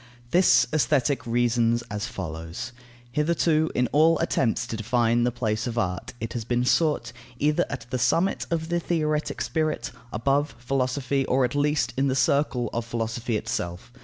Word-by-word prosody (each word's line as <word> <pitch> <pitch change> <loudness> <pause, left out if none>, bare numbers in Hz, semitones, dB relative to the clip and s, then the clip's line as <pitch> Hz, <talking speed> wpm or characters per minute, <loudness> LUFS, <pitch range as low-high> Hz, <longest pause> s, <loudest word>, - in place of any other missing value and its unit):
This 140 -9 +5
Aesthetic 140 -2 +1
reasons 120 0 +2
as 105 0 -3
follows: 80 +5 -6 0.4
Hitherto, 155 +2 +2
in 125 - +3
all 160 +3 +5
attempts 115 -4 0
to 115 - -5
define 120 +1 +2
the 125 - +1
place 110 -1 -2
of 120 -1 -4
art, 90 -3 -2
it 115 - -4
has 120 - -3
been 120 +2 0
sought, 145 -5 +1 0.2
either 150 +3 +2
at 135 - -5
the 130 - -1
summit 180 +9 +1
of 165 -1 -2
the 175 0 +1
theoretic 155 -3 -1
spirit, 155 -7 -1 0.2
above 135 +3 0
philosophy, 130 +2 0
or, 130 0 +3
at 125 - -3
least, 145 -4 +1
in 135 +1 +2
the 130 - +1
circle 135 -2 +1
of 115 - -1
philosophy 115 0 -2
itself. 90 +1 -4
125 Hz, 160 wpm, -25 LUFS, 115-150 Hz, 0.4 s, This